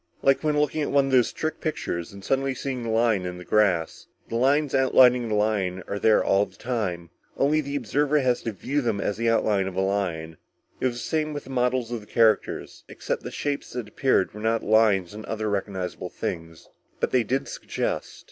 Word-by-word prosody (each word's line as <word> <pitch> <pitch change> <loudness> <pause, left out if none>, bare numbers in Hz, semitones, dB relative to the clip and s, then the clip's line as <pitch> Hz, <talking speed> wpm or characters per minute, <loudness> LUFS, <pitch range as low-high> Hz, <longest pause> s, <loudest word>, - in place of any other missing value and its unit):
Like 135 +2 +3
when 150 -1 +2
looking 150 +1 0
at 145 - -1
one 140 -1 +3
of 135 - -3
those 125 -2 +4
trick 155 0 -4
pictures 85 - -3
and 100 0 -11
suddenly 135 0 0
seeing 130 -1 -4
the 115 - -4
lion 110 -3 +2
in 90 0 -5
the 90 - -10
grass. 90 -5 +1 0.2
The - - -4
lines 140 +4 +2
outlining 125 -3 +5
the 105 - 0
lion 100 -4 0
are 100 - -3
there 110 0 +4
all 100 +1 +2
the - - -21
time, 95 -9 -3 0.3
only 150 +3 +3
the 140 -1 -5
observer 145 +4 +1
has 125 -3 +1
to 115 - -3
view 135 +8 -2
them 115 -5 -1
as 105 0 -2
the 115 0 +1
outline 105 -4 +2
of 95 - -6
a 95 - +1
lion. 90 -5 -2 0.4
It - - +1
was 120 - -3
the - - -6
same 155 -1 -1
with 145 - -5
the 135 - -11
models 125 -1 0
of 120 -2 -3
the 105 - -16
characters, 110 -3 +1
except - - -4
the - - -6
shapes 145 -1 -3
that 120 -3 -4
appeared 130 -3 +1
were 105 - -9
not 115 +1 0
of - - -6
lions 105 -5 +3
or 110 +1 -8
other 110 -1 -2
recognizable 95 -2 -3
things. 80 -1 -6 0.3
But - - 0
they 130 - +4
did 130 +4 -1
suggest." - - -3
115 Hz, 220 wpm, -25 LUFS, 100-135 Hz, 0.4 s, outlining